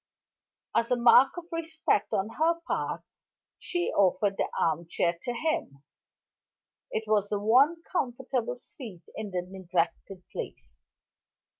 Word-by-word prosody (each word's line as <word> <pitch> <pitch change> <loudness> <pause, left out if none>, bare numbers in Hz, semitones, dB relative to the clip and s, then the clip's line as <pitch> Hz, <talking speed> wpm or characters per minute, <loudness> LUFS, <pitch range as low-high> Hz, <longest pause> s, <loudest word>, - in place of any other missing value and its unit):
As 230 - +2
a 250 - +4
mark 245 +5 +6
of 350 - -6
respect 320 -9 0
on 195 +3 0
her 335 +1 +3
part, - - -2 0.6
she 350 -1 -1
offered 200 +1 +3
the - - -1
armchair 170 +1 +1
to 245 - -3
him: 240 - -2 1.1
it 220 - -2
was 210 -2 +2
the 205 - 0
one 275 +11 +4
comfortable 250 -5 -2
seat 230 - -11
in 215 -1 -4
the 180 -2 -2
neglected 185 0 -2
place. - - -7
225 Hz, 125 wpm, -28 LUFS, 190-275 Hz, 1.1 s, mark